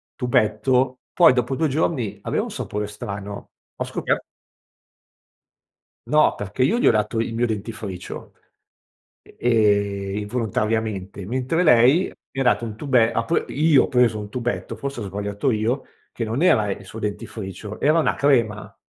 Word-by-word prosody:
tubetto, 125 Hz, +1 st, +1 dB
poi 125 Hz, -, +6 dB
dopo 125 Hz, +1 st, 0 dB
2 160 Hz, +3 st, +1 dB
giorni 135 Hz, -6 st, -1 dB
aveva -, -, -1 dB
un -, -, -6 dB
sapore 105 Hz, 0 st, -4 dB
strano. 100 Hz, -1 st, -7 dB, 0.3 s
Ho -, -, -1 dB
scoper -, -, -1 dB, 1.9 s
No, 155 Hz, 0 st, +4 dB
perché 105 Hz, +5 st, -2 dB
io 205 Hz, -, +2 dB
gli -, -, +3 dB
ho -, -, +7 dB
dato 105 Hz, +1 st, 0 dB
il 115 Hz, 0 st, -2 dB
mio 120 Hz, +1 st, +1 dB
dentifricio, 105 Hz, -4 st, -6 dB, 0.9 s
e -, -, -21 dB, 0.8 s
ehm, -, -, 0 dB
involontariamente, 105 Hz, -3 st, -2 dB
mentre 130 Hz, -, 0 dB
lei 130 Hz, +6 st, +6 dB, 0.3 s
mi 135 Hz, -, -5 dB
ha -, -, +1 dB
dato 125 Hz, -1 st, +2 dB
un 110 Hz, -2 st, -6 dB
tube 125 Hz, -4 st, +3 dB
ha 115 Hz, 0 st, -1 dB
pre 165 Hz, -, 0 dB
io 150 Hz, -1 st, +4 dB
ho -, -, -3 dB
preso 120 Hz, -4 st, +2 dB
un 105 Hz, -, -7 dB
tubetto, 120 Hz, +2 st, -3 dB
forse 140 Hz, -3 st, -5 dB
ho -, -, -4 dB
sbagliato 100 Hz, +4 st, -2 dB
io, 115 Hz, +3 st, 0 dB, 0.3 s
che -, -, -5 dB
non 115 Hz, +7 st, -2 dB
era 110 Hz, -, +4 dB
il 100 Hz, +1 st, -5 dB
suo 110 Hz, +4 st, -9 dB
dentifricio, 105 Hz, -1 st, -6 dB
era 155 Hz, +3 st, +4 dB
una 160 Hz, -, +2 dB
crema. 115 Hz, -7 st, +1 dB
115 Hz, 160 wpm, -22 LUFS, 105-130 Hz, 1.9 s, ho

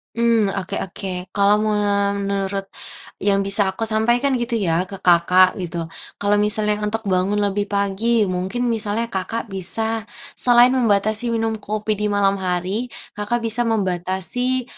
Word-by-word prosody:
Mmm, 230 Hz, -3 st, +2 dB
oke 195 Hz, -1 st, -3 dB
oke. 185 Hz, 0 st, -5 dB
Kalau 205 Hz, +1 st, +3 dB
menurut 200 Hz, -2 st, -1 dB, 0.6 s
yang 195 Hz, 0 st, +1 dB
bisa 200 Hz, 0 st, +4 dB
aku 190 Hz, +4 st, -3 dB
sampaikan 240 Hz, +5 st, +1 dB
gitu 240 Hz, 0 st, -2 dB
ya 180 Hz, -4 st, 0 dB
ke 195 Hz, -, -8 dB
Kakak 180 Hz, +2 st, +4 dB
gitu. 170 Hz, -2 st, -5 dB, 0.2 s
Kalau 205 Hz, 0 st, +1 dB
misalnya 210 Hz, 0 st, +2 dB
untuk 225 Hz, +1 st, -3 dB
bangun 190 Hz, 0 st, 0 dB
lebih 205 Hz, 0 st, -1 dB
pagi, 205 Hz, +3 st, +1 dB
mungkin 190 Hz, +6 st, -2 dB
misalnya 225 Hz, +1 st, -1 dB
Kakak 205 Hz, +4 st, -4 dB
bisa 220 Hz, +4 st, -1 dB, 0.2 s
selain 245 Hz, 0 st, +5 dB
membatasi 225 Hz, -1 st, +2 dB
minum 225 Hz, -1 st, -2 dB
kopi 215 Hz, 0 st, -3 dB
di 210 Hz, -, 0 dB
malam 200 Hz, -1 st, +1 dB
hari, 185 Hz, +6 st, -2 dB, 0.2 s
Kakak 230 Hz, +3 st, -3 dB
bisa 230 Hz, +1 st, +1 dB
membatasi, 200 Hz, +5 st, -1 dB
205 Hz, 140 wpm, -20 LUFS, 195-225 Hz, 0.6 s, selain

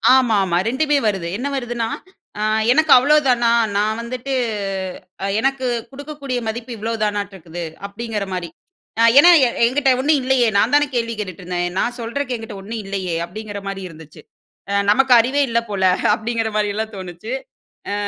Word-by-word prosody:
ஆமாமா. 205 Hz, -9 st, +2 dB
2மே 290 Hz, +5 st, +1 dB
வருது. 190 Hz, -5 st, -1 dB
என்ன 260 Hz, -, -3 dB
வருதுன்னா, 240 Hz, -3 st, -2 dB, 0.5 s
"அ -, -, -2 dB, 0.3 s
எனக்கு 315 Hz, +5 st, +3 dB
அவ்வளோதானா? 255 Hz, -4 st, +3 dB, 0.3 s
நான் 215 Hz, +2 st, 0 dB
வந்துட்டு 250 Hz, +3 st, -5 dB, 1.1 s
எனக்கு 270 Hz, +1 st, 0 dB, 0.3 s
குடுக்கக்கூடிய 280 Hz, -2 st, -5 dB
மதிப்பு 235 Hz, +3 st, -5 dB
இவ்ளோதானாட்ருக்குது" 205 Hz, -6 st, -3 dB, 0.2 s
அப்டீங்குற 210 Hz, 0 st, -4 dB
மாரி. 175 Hz, -2 st, -4 dB, 0.7 s
ஏன்னா 335 Hz, +5 st, +9 dB, 0.4 s
என்கிட்ட 270 Hz, +3 st, +2 dB
ஒன்னும் 295 Hz, +2 st, +3 dB
இல்லையே, 255 Hz, -2 st, +3 dB
நான் 225 Hz, +6 st, +2 dB
தானே 290 Hz, 0 st, +4 dB
கேள்வி 230 Hz, -1 st, -1 dB
கேட்டுட்டுருந்தேன். 180 Hz, -2 st, -3 dB
"நான் 240 Hz, +4 st, 0 dB
சொல்றக்கு 250 Hz, +3 st, -3 dB
என்கிட்டே 225 Hz, -3 st, -8 dB
ஒன்னும் 220 Hz, +3 st, -6 dB
இல்லையே?" 190 Hz, -3 st, -3 dB
அப்டீங்குற 205 Hz, +3 st, -7 dB
மாரி 195 Hz, 0 st, -4 dB
இருந்துச்சு. 155 Hz, -1 st, -14 dB, 0.7 s
"நமக்கு 265 Hz, +3 st, +4 dB
அறிவே 260 Hz, +5 st, +2 dB
இல்லை 235 Hz, 0 st, +1 dB
போல" 195 Hz, -2 st, -2 dB, 0.3 s
அப்டீங்குற 225 Hz, 0 st, -2 dB
மாதிரிலாம் 215 Hz, +1 st, -2 dB
தோணுச்சு. 185 Hz, +5 st, -7 dB, 0.6 s
அ -, -, -1 dB
230 Hz, 135 wpm, -20 LUFS, 200-260 Hz, 1.1 s, ஏன்னா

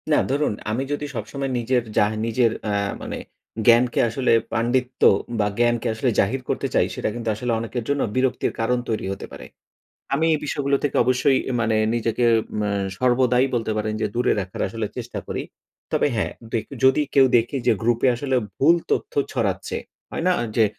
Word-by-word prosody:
না, 150 Hz, -, +4 dB
ধরুন 145 Hz, -3 st, +1 dB, 0.2 s
আমি 120 Hz, +5 st, -1 dB
যদি 145 Hz, 0 st, -2 dB
সবসময় 135 Hz, +5 st, -4 dB
নিজের 120 Hz, +1 st, +1 dB
যা -, -, +6 dB, 0.2 s
নিজের 115 Hz, 0 st, +2 dB
অ্যা 105 Hz, -1 st, 0 dB, 0.2 s
মানে -, -, -5 dB, 0.5 s
জ্ঞানকে 120 Hz, +1 st, +5 dB
আসলে 125 Hz, +3 st, 0 dB, 0.2 s
পাণ্ডিত্য 125 Hz, +2 st, 0 dB, 0.4 s
বা 105 Hz, -, +2 dB
জ্ঞানকে 120 Hz, 0 st, +2 dB
আসলে 115 Hz, +4 st, 0 dB
জাহির 125 Hz, +7 st, +1 dB
করতে -, -, -1 dB
চাই -, -, +4 dB
সেটা -, -, -1 dB
কিন্তু 115 Hz, -2 st, -3 dB
আসলে 120 Hz, +3 st, -2 dB
অনেকের 115 Hz, +1 st, -4 dB
জন্য 145 Hz, 0 st, +1 dB
বিরক্তির 130 Hz, -1 st, 0 dB
কারণ 120 Hz, +2 st, +1 dB
তৈরি 110 Hz, -, -1 dB
হতে 100 Hz, -, -8 dB
পারে। -, -, -9 dB, 0.7 s
আমি 155 Hz, +4 st, +2 dB
এই -, -, 0 dB
বিষয়গুলো 140 Hz, -1 st, 0 dB
থেকে 145 Hz, -, 0 dB
অবশ্যই 130 Hz, +2 st, +3 dB, 0.2 s
মানে 110 Hz, -1 st, +1 dB, 0.2 s
নিজেকে 115 Hz, +1 st, 0 dB, 0.4 s
আ -, -, 0 dB, 0.3 s
সর্বদাই 125 Hz, 0 st, +3 dB
বলতে 115 Hz, -2 st, -1 dB
পারেন 110 Hz, 0 st, -1 dB
যে 110 Hz, -, +1 dB
দূরে 120 Hz, +1 st, +2 dB
রাখার 95 Hz, -1 st, -5 dB, 0.4 s
চেষ্টা 120 Hz, -1 st, -5 dB
করি। -, -, -3 dB, 0.5 s
তবে -, -, +2 dB
হ্যাঁ, 110 Hz, -, -1 dB, 0.2 s
দে 115 Hz, -, +2 dB
কেউ 135 Hz, -, -10 dB
যদি 130 Hz, +3 st, +5 dB
কেউ 135 Hz, -1 st, +7 dB
দেখে 120 Hz, +4 st, +1 dB
যে -, -, +6 dB
গ্রুপে 120 Hz, +2 st, +2 dB
আসলে 130 Hz, +2 st, -1 dB, 0.2 s
ভুল 165 Hz, +5 st, +5 dB
তথ্য -, -, -1 dB, 0.2 s
ছড়াচ্ছে, 100 Hz, -7 st, -1 dB, 0.3 s
হয় -, -, -3 dB
না? -, -, +5 dB, 0.2 s
যে 115 Hz, -, +5 dB
120 Hz, 175 wpm, -23 LUFS, 115-130 Hz, 0.7 s, কেউ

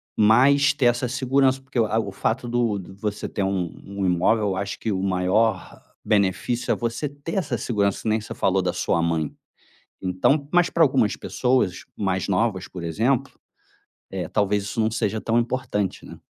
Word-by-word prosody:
mas 135 Hz, +7 st, +5 dB
ter 130 Hz, -, 0 dB
essa 120 Hz, +1 st, +2 dB
segurança, 130 Hz, +1 st, +2 dB
porque, 130 Hz, -2 st, -4 dB
eh, 110 Hz, -1 st, +1 dB
o 100 Hz, -3 st, -1 dB
fato 115 Hz, +5 st, -2 dB
do 120 Hz, -4 st, 0 dB, 0.2 s
você 105 Hz, 0 st, -3 dB
ter 100 Hz, -, -3 dB
um 95 Hz, -3 st, -1 dB
um 100 Hz, 0 st, -3 dB
imóvel 95 Hz, +4 st, +2 dB
eu 95 Hz, -, -1 dB
acho 100 Hz, +2 st, -4 dB
que 110 Hz, -, -2 dB
o 95 Hz, -2 st, -1 dB
maior 95 Hz, +3 st, 0 dB, 0.2 s
benefício 105 Hz, +3 st, +1 dB
é -, -, +3 dB
você 120 Hz, +5 st, -3 dB
ter 145 Hz, +5 st, -7 dB
essa 180 Hz, -6 st, -1 dB
segurança, 100 Hz, -4 st, -1 dB
que -, -, -1 dB
nem 110 Hz, 0 st, +1 dB
você 105 Hz, -, -7 dB
falou -, -, +2 dB
da -, -, -1 dB
sua 85 Hz, -, 0 dB
mãe, 85 Hz, -2 st, -1 dB, 0.7 s
então 115 Hz, +11 st, +1 dB
mas 175 Hz, -1 st, +4 dB
pra 170 Hz, -, +3 dB
algumas 130 Hz, -8 st, +3 dB
pessoas 125 Hz, -8 st, 0 dB
mais 95 Hz, -2 st, -1 dB
novas, 95 Hz, -2 st, 0 dB
por 90 Hz, -, -8 dB
exemplo, 120 Hz, -, 0 dB, 0.8 s
eh, -, -, -3 dB
talvez 105 Hz, 0 st, +1 dB
isso 105 Hz, +3 st, -3 dB
não 110 Hz, 0 st, +2 dB
seja 110 Hz, -1 st, -1 dB
tão 115 Hz, +2 st, +1 dB
importante, 115 Hz, -5 st, -2 dB
né. -, -, -11 dB
110 Hz, 180 wpm, -23 LUFS, 95-125 Hz, 0.8 s, mas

